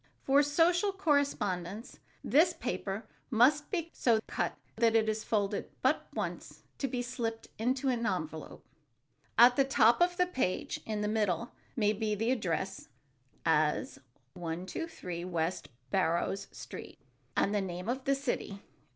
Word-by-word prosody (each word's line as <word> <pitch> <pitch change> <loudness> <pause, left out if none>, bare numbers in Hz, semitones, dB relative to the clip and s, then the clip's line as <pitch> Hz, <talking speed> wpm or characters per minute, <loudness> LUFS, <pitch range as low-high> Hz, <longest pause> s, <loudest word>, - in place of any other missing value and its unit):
For 275 +1 +5
social 340 +7 +3
correspondence 240 - -1 0.2
this 315 +6 +4
paper 200 +2 -3 0.2
must 275 +5 +4
be 335 -4 -2
so 230 -3 +3
cut - - -2 0.2
that 230 -1 +3
it 220 -1 +4
is 215 0 -1
folded 205 -2 -1
but - - +2
once - - -5 0.2
to 275 - 0
be 245 -1 -2
slipped 230 -2 -4
into 255 +4 0
an 245 -3 +1
envelope. 160 -4 -4 0.7
At 245 +2 +8
the 275 - +6
top 240 -1 +4
of 355 0 +3
the 360 - +4
page 260 - -1
in 215 -1 -2
the 210 - 0
middle 210 -2 0 0.2
may 210 -3 +2
be 215 0 -1
the 225 +4 0
address, 190 -4 -2 0.6
as 155 -2 +2 0.3
"123 180 - -5
West 170 0 -2 0.2
Barrows 185 +2 +1
Street," - - -9 0.4
and 200 - +2
the 205 - +2
name 180 0 -5
of 260 +2 -2
the 275 - +3
city. 245 -7 -3
225 Hz, 140 wpm, -31 LUFS, 190-270 Hz, 0.7 s, At